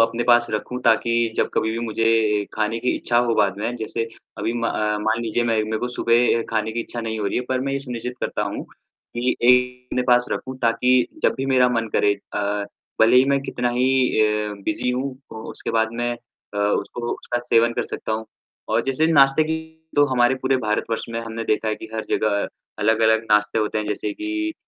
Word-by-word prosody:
अपने 115 +1 +1
पास 120 -1 +5
रखूँ, 115 +4 -3
ताकि 115 0 +2
जब - - +1
कभी 110 - +1
भी 115 - -3
मुझे 110 0 -2
ए 110 -2 +2
खाने 110 +1 -1
की 125 - +1
इच्छा 120 - +1
हो 115 - +2
बाद 100 -2 +2
में, 115 +4 -2
जैसे 115 0 -3 0.3
अभी 110 +3 -1
म 120 -1 -2
अ, 105 -2 0
मान 110 +2 0
लीजिए 115 +1 0
मैं 115 -1 +1
मेरे 110 0 -2
को 125 - -2
सुबह 120 -1 +2
खाने 110 -1 -1
की 120 - -2
इच्छा 120 0 -6
नहीं 110 -1 -3
हो 105 - -1
रही - - -1
है, - - 0
पर 130 -1 0
मैं 135 - -1
ये 140 - 0
सुनिश्चित 125 -2 -5
करता - - -2
हूँ, - - -4
कि 125 +1 -5
एक 125 +1 +3
अपने 125 - +1
पास 125 0 +5
रखूँ, 130 0 -4
ताकि 115 +2 +3 0.3
जब - - +3
भी 135 - -2
मेरा 130 -2 +4
मन 115 -2 -1
करे 105 - +4 0.2
अ, - - 0 0.6
भले 115 +3 +6
ही 130 - +7
मैं 140 - +1
कितना 125 -2 -2
ही 125 +1 +1 0.3
अ, 105 -1 +1
बिज़ी 155 -6 -1
हूँ, 125 +2 -1 0.3
उ - - -8
उसके - - -6
बाद 110 0 +2
मैं 120 0 0
अ, 120 -3 -12 0.2
उसको 120 0 -5
उसका 120 - -3
सेवन 115 -1 +3
कर - - -1
सकता - - -4
हूँ। 110 0 -2 0.5
और - - +3
जैसे 135 +4 +1
नाश्ते 140 -2 +5
की 160 +1 -1 0.4
तो 145 - +6
हमारे 120 0 +4
पूरे 130 0 +2
भारतवर्ष 115 -1 -1
में 115 0 -3
हमने 115 0 -5
देखा 110 0 0
है 110 - 0
कि 110 - -10
हर 110 - -3
जगह 100 -1 +1 0.3
अलग-अलग 110 +1 +3
नाश्ते 105 +1 +3
होते 110 0 0
हैं, 105 - -3
जैसे 105 0 -2
कि 325 0 -3
115 Hz, 220 wpm, -22 LUFS, 110-125 Hz, 0.6 s, ही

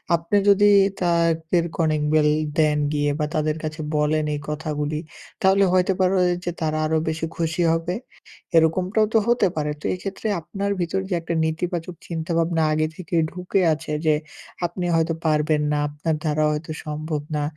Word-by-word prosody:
আপনি 170 +5 0
যদি 205 +1 +6 0.3
তাদের 170 -1 +2
কলিং 155 -2 +1
বেল 150 -1 +4 0.3
দেন 150 -1 +3 0.2
গিয়ে 145 0 +1
বা 150 - +1
তাদের 155 0 +1
কাছে 155 +1 -4 0.2
বলেন 150 +1 +1
এই - - -4
কথাগুলি, 150 0 -2 0.4
তাহলে 195 0 +4
হইতে 185 +1 +3
পারে 185 0 +3
ও - - +4 0.2
যে 175 - -1
তারা 155 -1 0
আরো 160 +1 +1
বেশি 160 +1 -1
খুশি 165 +1 -1
হবে। 165 +2 -1 0.6
এরকমটাও 185 +7 +3
তো - - +5
হতে 235 -4 +3
পারে? 150 -1 -1
তো - - -11
এইক্ষেত্রে 195 +4 -5
আপনার 195 +5 -4
ভেতর 175 +2 -1
যে - - -1
একটা 170 0 -3
নেতিবাচক 170 +2 -2
চিন্তাভাবনা 165 0 0
আগে 155 0 +1
থেকেই 170 -3 -1
ঢুকে 180 +2 -1
আছে 155 0 -6
যে 155 -1 +4 0.5
আপনি 175 +1 -3
হয়তো 165 0 +1
পারবেন 155 -1 +2
না, 150 - +1
আপনার 150 +2 -2
দ্বারা 155 0 +1
হয়তো 155 +1 -4
সম্ভব 150 0 -3
না 150 - 0
160 Hz, 165 wpm, -23 LUFS, 155-180 Hz, 0.6 s, যদি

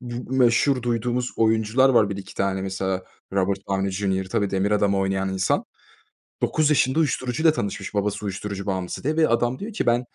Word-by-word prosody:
Bu 120 +1 -6
meşhur 125 +1 +3
duyduğumuz 120 +1 -1
oyuncular 110 +4 +3
var, 110 -5 +4
1-2 95 -1 -7
tane, 95 -1 -1
mesela, 95 -1 -2 0.3
Robert 100 0 +1
Downey 95 0 0
Jr. 95 -1 -1
Tabii 100 -2 0
Demir 95 +2 0
Adamı 100 -2 +2
oynayan 95 0 0
insan. 95 0 0 0.8
9 155 -1 +2
Yaşında 135 0 +2
uyuşturucu 135 -2 0
ile 160 -2 +6
tanışmış, 105 -4 -4
babası 105 +1 -1
uyuşturucu 100 0 -4
bağımlısı 95 +3 -3
diye 155 +2 0
ve 160 - +4
adam 120 +2 +1
diyor 215 +3 -6
ki - - -2
ben 120 0 +3
105 Hz, 180 wpm, -23 LUFS, 95-125 Hz, 0.8 s, ile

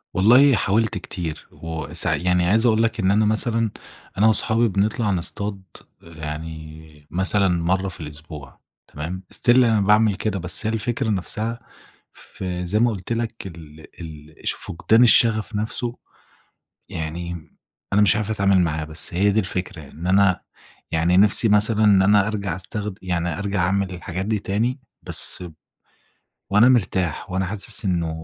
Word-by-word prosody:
والله 125 +8 +6
حاولت 110 +2 0
كتير 80 -5 -6
وسع 80 -3 -2
يعني 90 0 +1
عايز 110 +6 +3
اقول 115 -1 +3
لك 115 0 -1
إن 95 -1 +2
أنا 105 +2 +3
مثلًا، 115 +1 +1 0.5
أنا 105 +3 +4
واصحابي 110 +2 +3
بنطلع 105 +2 0
نصطاد 100 +2 -3 0.4
يعني 80 -1 -9
مثلًا 95 +3 +1
مرة 90 +2 0
في 90 - -10
الأسبوع، 75 -2 -10 0.3
تمام، 85 +6 -6
still - - -1
أنا 115 -4 +4
باعمل 105 +1 +4
كده. 100 0 -2
بس 90 +4 -4
هي 110 - 0
الفكرة 115 +2 -2
نفسها 110 +4 -2 0.5
في 90 -1 -6
زي 100 +5 0
ما 120 +1 +3
قُلت 100 +2 -4
لك 115 -3 -4
ال 80 -3 -12 0.2
ال 75 -1 -10
ش - - +2
فُقدان 110 +7 +2
الشغف 115 -2 +3
نفسه، 115 +3 -2 0.9
يعني 85 -1 -5 0.4
أنا 100 - +4
مش 105 0 +4
عارف 105 0 -2
اتعامل 100 -3 +2
معاها. 75 -3 -1
بس 80 +2 -6
هي 100 +4 +3
دي 105 +2 +2
الفكرة، 90 -5 -5
إن 85 +3 -8
أنا 95 -1 +3 0.5
يعني 85 +2 +2
نفسي 105 +3 +4
مثلًا 105 +1 +3
إن 100 -2 +5
أنا 100 +1 +4
أرجع 100 -5 -3
استخد 105 +1 -5
يعني 90 -2 -2
أرجع 100 -1 -2
أعمل 100 +1 0
الحاجات 90 +2 -5
دي 110 0 0
تاني، 115 +7 -1 0.2
بس - - -2
ب 85 -3 -9 1.0
وأنا 105 +5 +6
مرتاح، 95 - 0
وأنا 95 +1 -1
حاسس 105 +3 -3
إنه 85 -3 0
95 Hz, 155 wpm, -22 LUFS, 85-110 Hz, 1.0 s, والله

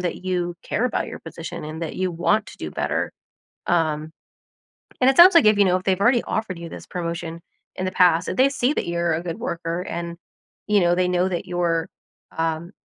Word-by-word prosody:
that 180 +1 -4
you 175 -2 -1
care 225 - -1
about 245 - -2
your - - -7
position 165 0 -7
and 155 +2 -7
that 165 - -4
you 185 -1 0
want 195 +5 +1
to - - -12
do - - -5
better, - - -2 0.5
um, 155 -2 0 0.9
and 255 - +5
it 270 - -1
sounds 355 +2 +9
like 335 - +7
if 215 -1 +6
you 200 - +6
know, 185 -1 +3
if 185 - -5
they've 190 -1 +1
already 240 +3 +4
offered 185 -6 -3
you 170 0 -7
this - - -10
promotion 170 -1 -5 0.4
in 185 - -3
the 185 - -2
past, 175 -2 +4
if - - -3
they 265 +2 +5
see 270 0 +1
that - - -2
you're 170 -1 0
a 160 - -2
good 175 +2 -5
worker 170 -6 -3
and, 170 -1 -5 0.5
you 210 -1 +3
know, 175 0 +3
they 185 0 +2
know 180 +1 +1
that 185 0 -3
you're, 170 -2 0 0.5
um, 165 +2 -2
175 Hz, 220 wpm, -23 LUFS, 170-190 Hz, 0.9 s, sounds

